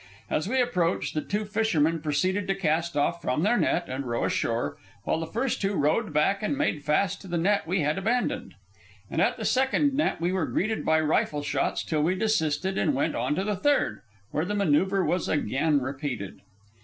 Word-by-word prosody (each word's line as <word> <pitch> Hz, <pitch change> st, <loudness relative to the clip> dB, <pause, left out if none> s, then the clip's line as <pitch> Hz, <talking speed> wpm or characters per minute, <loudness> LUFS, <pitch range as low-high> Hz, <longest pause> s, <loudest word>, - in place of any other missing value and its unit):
As 155 Hz, +4 st, 0 dB
we 260 Hz, +2 st, +1 dB
approached, 185 Hz, -9 st, 0 dB
the 155 Hz, -, -1 dB
two 210 Hz, +5 st, -2 dB
fishermen 170 Hz, -7 st, +1 dB
proceeded 185 Hz, +6 st, 0 dB
to 195 Hz, -, +1 dB
cast 170 Hz, -3 st, 0 dB
off 170 Hz, +4 st, +1 dB
from 130 Hz, +3 st, 0 dB
their 215 Hz, +5 st, +3 dB
net 175 Hz, -7 st, +1 dB
and 130 Hz, +2 st, -4 dB
row 120 Hz, -2 st, -1 dB
ashore, 115 Hz, +1 st, -1 dB, 0.3 s
while -, -, 0 dB
the 165 Hz, -, -4 dB
first 235 Hz, +8 st, -2 dB
two 200 Hz, 0 st, 0 dB
rowed 160 Hz, +7 st, +1 dB
back 155 Hz, +7 st, +2 dB
and 215 Hz, +6 st, -1 dB
made 220 Hz, -, 0 dB
fast 180 Hz, +6 st, +1 dB
to 195 Hz, -, -11 dB
the 175 Hz, -1 st, -2 dB
net 195 Hz, +1 st, +1 dB
we 180 Hz, +1 st, +1 dB
had 150 Hz, +5 st, 0 dB
abandoned. 220 Hz, -, -1 dB, 0.6 s
And -, -, 0 dB
at -, -, +2 dB
the -, -, -4 dB
second 265 Hz, +2 st, +2 dB
net 295 Hz, +3 st, 0 dB
we 170 Hz, +2 st, 0 dB
were 185 Hz, -3 st, 0 dB
greeted 215 Hz, +3 st, -1 dB
by 160 Hz, 0 st, +3 dB
rifle 150 Hz, -1 st, 0 dB
shots 140 Hz, -1 st, -1 dB
till 155 Hz, -2 st, -1 dB
we 170 Hz, +5 st, +2 dB
desisted 190 Hz, -3 st, 0 dB
and 150 Hz, -6 st, +1 dB
went 140 Hz, -, 0 dB
on 130 Hz, +5 st, -1 dB
to 190 Hz, -, -1 dB
the 210 Hz, 0 st, -1 dB
third, 290 Hz, +9 st, +1 dB, 0.3 s
where 155 Hz, -, 0 dB
the 205 Hz, +4 st, -2 dB
manoeuvre 190 Hz, +1 st, +2 dB
was 180 Hz, -1 st, 0 dB
again 145 Hz, +2 st, +1 dB
repeated. 130 Hz, -6 st, -5 dB
170 Hz, 205 wpm, -27 LUFS, 150-205 Hz, 0.6 s, their